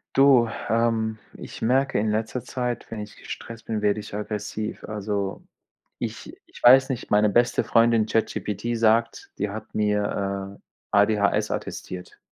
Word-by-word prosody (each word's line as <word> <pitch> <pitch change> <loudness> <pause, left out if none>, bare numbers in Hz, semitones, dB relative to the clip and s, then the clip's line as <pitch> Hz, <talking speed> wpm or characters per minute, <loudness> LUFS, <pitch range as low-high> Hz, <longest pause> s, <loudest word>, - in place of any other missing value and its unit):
Du, 135 -4 +6 0.2
ähm, 115 -1 +1 0.2
ich - - -10
merke 130 +4 +2
in 105 +1 +1
letzter 110 +3 -2
Zeit, 125 -2 -3
wenn 115 - -5
ich 105 0 -8
gestresst 115 0 -9
bin, 110 -2 -2
werde 105 0 +1
ich - - -11
aggressiv. 105 0 -4
Also, 100 -2 -3 0.6
ich - - -6
ich - - -16
weiß 130 +2 +7
nicht, 125 -2 -4
meine 105 +1 +4
beste 120 +4 +2
Freundin 115 -1 +4
ChatGPT 115 +1 -1
sagt 115 +1 +1
die 105 0 -1
hat 110 +1 -8
mir, 100 -2 -1
äh, - - -7
ADHS 100 0 +3
attestiert. 90 -1 -6
110 Hz, 145 wpm, -25 LUFS, 105-115 Hz, 0.6 s, weiß